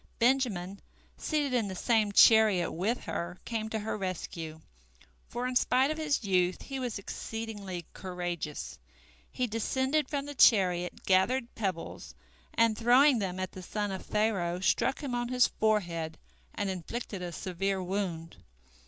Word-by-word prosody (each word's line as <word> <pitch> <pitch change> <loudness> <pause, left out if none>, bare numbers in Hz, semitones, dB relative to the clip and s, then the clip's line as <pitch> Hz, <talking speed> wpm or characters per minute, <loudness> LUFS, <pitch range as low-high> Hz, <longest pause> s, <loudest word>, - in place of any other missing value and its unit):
Benjamin, 230 -7 +1 0.4
seated 295 -4 -1
in 235 -4 +1
the 190 - -5
same 220 0 +2
chariot 215 -4 +6
with 205 +9 -1
her, 170 +1 -4
came 220 -2 -3
to 220 - -2
her 215 0 -3
rescue, 170 -5 -5 0.7
for 240 +1 -4
in 255 - -3
spite 255 +3 +3
of 310 - -4
his 295 -5 0
youth 185 -2 +1
he 270 -1 -5
was 245 -4 -3
exceedingly 200 -3 -6
courageous. 175 -5 -5 0.5
He 255 - -1
descended 260 +6 0
from 280 -2 -2
the 290 - -6
chariot, 180 -9 +4
gathered 235 +7 +2
pebbles, 190 -6 -4 0.4
and, 230 -1 +4
throwing 245 +4 +5
them 185 -2 -3
at 185 -1 -3
the 185 - -9
son 205 +2 -3
of 190 - -5
Pharaoh, 195 -5 0
struck 260 +9 +1
him 270 -3 -3
on 240 0 -1
his 250 0 +4
forehead 175 -7 0 0.4
and 205 - -1
inflicted 190 +2 -5
a 175 -1 -4
severe 190 +2 -2
wound. 180 -3 -3
210 Hz, 150 wpm, -30 LUFS, 180-245 Hz, 0.7 s, chariot